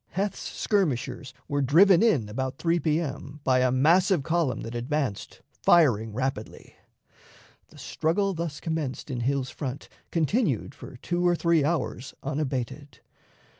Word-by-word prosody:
Heth's 195 Hz, +1 st, -2 dB
skirmishers 145 Hz, -, -1 dB, 0.2 s
were 145 Hz, 0 st, -1 dB
driven 170 Hz, +7 st, +5 dB
in 190 Hz, -, +3 dB
about 130 Hz, +5 st, -4 dB
3 170 Hz, 0 st, +1 dB
P.M. 150 Hz, -2 st, -2 dB
by 130 Hz, -1 st, +3 dB
a 130 Hz, 0 st, +3 dB
massive 170 Hz, +5 st, +3 dB
column 160 Hz, -6 st, 0 dB
that 115 Hz, -, -6 dB
advanced, 125 Hz, -2 st, -3 dB
firing 120 Hz, -10 st, +3 dB
rapidly. 125 Hz, -1 st, -4 dB, 0.9 s
The -, -, -18 dB
straggle 195 Hz, +5 st, -1 dB
thus 165 Hz, -3 st, -4 dB
commenced 155 Hz, -4 st, -4 dB
in 125 Hz, -, -3 dB
Hill's 130 Hz, +2 st, -1 dB
front 135 Hz, 0 st, -6 dB, 0.2 s
continued 165 Hz, -, 0 dB
for 130 Hz, -, -11 dB
two 175 Hz, +6 st, -1 dB
or 175 Hz, -, +3 dB
three 170 Hz, -2 st, +2 dB
hours 145 Hz, -4 st, -2 dB
unabated. 135 Hz, 0 st, -4 dB
145 Hz, 130 wpm, -26 LUFS, 130-170 Hz, 0.9 s, driven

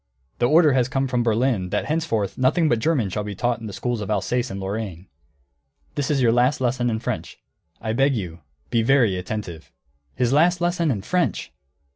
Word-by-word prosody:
The 120 Hz, -, +3 dB
order 155 Hz, -1 st, +5 dB
has 130 Hz, -1 st, +2 dB
come 135 Hz, +1 st, 0 dB
from 125 Hz, -1 st, 0 dB
Berlin 115 Hz, -4 st, +1 dB
that -, -, -1 dB
henceforth 150 Hz, -10 st, -1 dB
nothing 155 Hz, +6 st, +2 dB
but 120 Hz, -6 st, +2 dB
German 120 Hz, -, +1 dB
shall 105 Hz, -, -2 dB
be 100 Hz, -1 st, -6 dB
taught 120 Hz, +3 st, 0 dB
in 110 Hz, -, -7 dB
the -, -, -6 dB
schools 110 Hz, +4 st, -3 dB
of 105 Hz, -, -5 dB
Alsace 120 Hz, +5 st, 0 dB
and 95 Hz, -, -5 dB
Lorraine. 95 Hz, -2 st, -5 dB, 0.9 s
This 145 Hz, -, -2 dB
is 140 Hz, -4 st, +2 dB
your 115 Hz, -, +5 dB
last 125 Hz, +5 st, +2 dB
lesson 125 Hz, -1 st, 0 dB
in 110 Hz, -, -1 dB
French. 110 Hz, -, -4 dB, 0.4 s
I 110 Hz, -, -3 dB
beg 135 Hz, +3 st, +2 dB
you, 90 Hz, -6 st, -5 dB, 0.3 s
be 115 Hz, -, +3 dB
very 120 Hz, -5 st, +3 dB
attentive." 90 Hz, -3 st, -6 dB, 0.5 s
_His 125 Hz, -1 st, +2 dB
last 170 Hz, +4 st, +4 dB
lesson 175 Hz, -1 st, +1 dB
in 105 Hz, -8 st, -1 dB
French! 180 Hz, -, -1 dB
120 Hz, 195 wpm, -23 LUFS, 105-135 Hz, 0.9 s, order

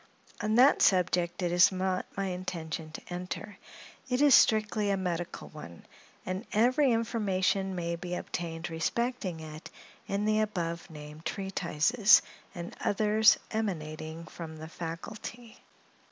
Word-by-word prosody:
On 215 Hz, +1 st, +1 dB
that 260 Hz, +4 st, +6 dB
subject 180 Hz, -1 st, +2 dB
it 175 Hz, -, 0 dB
is 175 Hz, +2 st, +6 dB
not 185 Hz, 0 st, -1 dB
my 195 Hz, -, 0 dB
intention 175 Hz, -4 st, -4 dB
to -, -, -8 dB
enter; 180 Hz, +3 st, -6 dB, 0.5 s
it 250 Hz, 0 st, +1 dB
is 290 Hz, -2 st, +6 dB
a -, -, +10 dB
strictly 210 Hz, -2 st, +1 dB
medical 175 Hz, -2 st, -4 dB
one, 85 Hz, -, -11 dB, 0.4 s
and 185 Hz, +3 st, -3 dB
every 255 Hz, +5 st, +4 dB
information 195 Hz, -4 st, 0 dB
may 170 Hz, -1 st, -2 dB
be 175 Hz, +1 st, -5 dB
obtained 170 Hz, -1 st, -5 dB
respecting 185 Hz, +1 st, -2 dB
it 155 Hz, +1 st, -9 dB, 0.4 s
in 200 Hz, +1 st, -1 dB
the 215 Hz, 0 st, +2 dB
above 170 Hz, -6 st, -2 dB
named 150 Hz, 0 st, -10 dB
treatises, 195 Hz, +3 st, +3 dB, 0.3 s
and 175 Hz, -1 st, -7 dB
others 215 Hz, +2 st, +4 dB
emanating 160 Hz, -6 st, -4 dB
from 160 Hz, -1 st, -8 dB
the 160 Hz, +1 st, -8 dB
faculty. 205 Hz, +8 st, -7 dB
185 Hz, 130 wpm, -30 LUFS, 165-215 Hz, 0.5 s, a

